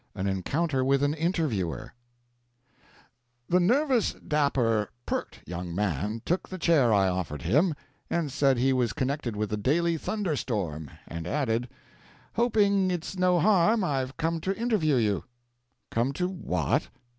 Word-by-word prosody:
AN 95 - -3
ENCOUNTER 130 - 0
WITH 135 +1 +2
AN 145 +1 +2
INTERVIEWER 155 - -1 1.5
The 180 - +3
nervous, 250 +5 +2
dapper, 125 -8 +1 0.2
"peart" - - -4
young 90 0 -5
man 105 +3 -1
took 175 +3 -1
the 185 - -5
chair 160 -9 +3
I 100 -2 +4
offered 90 -5 -3
him, 150 - +3 0.3
and 165 -5 -1
said 135 -1 +3
he 130 +2 +3
was 125 -3 +1
connected 130 -3 -2
with 105 0 -2
the 105 - 0
Daily 165 +9 +1
Thunderstorm, 110 - -2 0.2
and 85 0 -6
added: 120 -3 0 0.6
"Hoping 205 -5 +3
it's 175 +1 -3
no 180 -1 +3
harm, 210 +3 +4
I've 135 -5 -2
come 165 0 -1
to 195 +3 -2
interview 215 - +1
you." 105 -7 +1 0.7
"Come 120 +4 0
to 180 +5 -1
what?" 185 -1 -1
140 Hz, 140 wpm, -27 LUFS, 105-175 Hz, 1.5 s, I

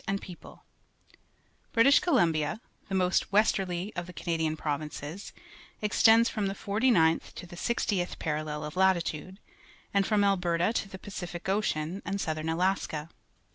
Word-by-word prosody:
— - - -34
British 265 +5 +6
Columbia, 175 - +1 0.3
the 195 - -1
most 185 +1 +1
westerly 195 -2 +1
of 175 0 -4
the 180 - -10
Canadian 160 -2 -1
provinces, 150 +4 -4 0.5
extends 225 +2 +5
from 210 -4 -1
Jjie 195 - -3 0.3
49th 165 -7 +3
to 180 - -8
the 175 - -11
60th 190 -3 -1
parallel 150 -1 -3
of 150 - -7
latitude, 185 -1 +1 0.5
and 200 -1 +2
from 210 -2 +2
AlTierfa 180 -1 +2
to 200 - -2
theJPaciHc 190 -2 -7
Ocean 190 -3 -1
and 200 0 -3
southern 155 -2 -2
Alaska. 165 -3 -1
180 Hz, 130 wpm, -29 LUFS, 160-200 Hz, 0.5 s, British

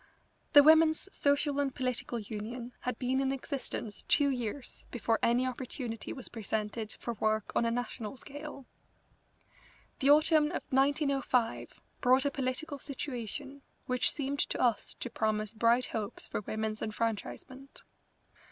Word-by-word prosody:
The 290 - +10
Women's 315 +4 +5
Social 285 0 +2
and 275 -2 0
Political 250 -2 -2
Union 230 +4 -6
had 250 -2 -3
been 260 +1 0
in 270 0 +1
existence 260 -5 -4
two 285 -1 +4
years 245 0 -4
before 230 -2 0
any 240 +2 +3
opportunity 250 -2 -4
was 260 - -6
presented 220 0 -3
for 235 - -5
work 215 -1 0
on - - +3
a - - +2
national 245 0 -3
scale. 285 +1 -8 1.3
The 270 - +3
autumn 305 +1 +6
of 305 - -3
1905 270 -3 +1 0.2
brought 260 +2 +5
a 285 - +2
political 275 +2 -3
situation 275 0 -5 0.2
which 250 0 +2
seemed 280 -1 -3
to - - 0
us 240 -4 +2
to 245 - -5
promise 215 -1 0
bright 235 +2 +3
hopes 210 -2 -4
for - - -3
women's 215 +1 -3
enfranchisement. 230 +5 -4
255 Hz, 135 wpm, -31 LUFS, 225-280 Hz, 1.3 s, The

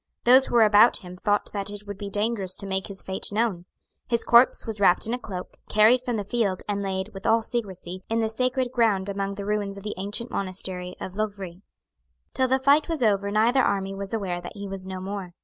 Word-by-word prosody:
Those 260 +2 +6
who - - -3
were 230 - +7
about 215 +1 +5
him 180 0 -9
thought 205 +3 -1
that 200 -1 -2
it 205 0 -9
would 205 -1 -8
be 200 -1 -5
dangerous 205 -3 -1
to 200 - -6
make 190 0 -2
his 195 -1 -7
fate 190 0 -3
known. 205 -5 -1 0.4
His 235 -1 +1
corpse 235 +2 +5
was 220 -3 -4
wrapped 185 -3 +4
in 225 - -1
a 250 - -2
cloak, 185 -6 -8
carried 220 +4 +5
from 250 -2 -2
the 210 - -2
field, 200 -3 -1
and 200 -1 -1
laid, 190 0 -3
with 195 -1 -6
all 225 0 +3
secresy, 185 -6 -4
in 225 - 0
the 225 -1 +1
sacred 255 +2 -1
ground 210 -6 +1
among 200 0 -3
the 200 0 -6
ruins 205 -1 -2
of 200 - -10
the 210 - -4
ancient 205 +5 -3
monastery 185 -1 -4
of 190 +1 -7
Loughrea. 200 -4 -4 0.7
Till 260 - +1
the 260 +1 +3
fight 285 +4 +3
was 320 -6 -1
over 200 -2 +2
neither 225 +6 +3
army 195 -4 0
was 195 0 -6
aware 190 -5 -2
that 175 - -9
he 200 0 -6
was 190 -1 -7
no 190 0 -5
more. 190 -2 -6
205 Hz, 230 wpm, -25 LUFS, 190-230 Hz, 0.7 s, were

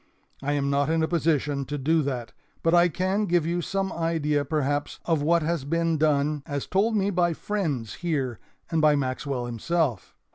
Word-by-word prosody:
I 145 +1 -1
am 140 -1 0
not 140 +1 +1
in 160 0 +2
a - - +2
position 150 -4 +1
to 145 +2 -4
do 160 +4 +2
that, 125 -5 -3 0.3
but 165 - +3
I 175 0 +6
can 190 +5 0
give 175 -3 +2
you 175 +1 0
some 195 +2 -2
idea 160 -3 0
perhaps 145 0 -1
of 165 -4 +1
what 165 +2 +3
has 165 -2 -1
been 165 +2 0
done 150 -1 +2
as 145 -1 -3
told 215 +4 +1
me 200 -1 +1
by 175 -2 +2
friends 155 - -2
here 140 -9 -1 0.3
and 165 -1 +2
by 150 -1 +5
Maxwell 130 -1 -2
himself. 120 - -1
155 Hz, 185 wpm, -26 LUFS, 140-170 Hz, 0.3 s, I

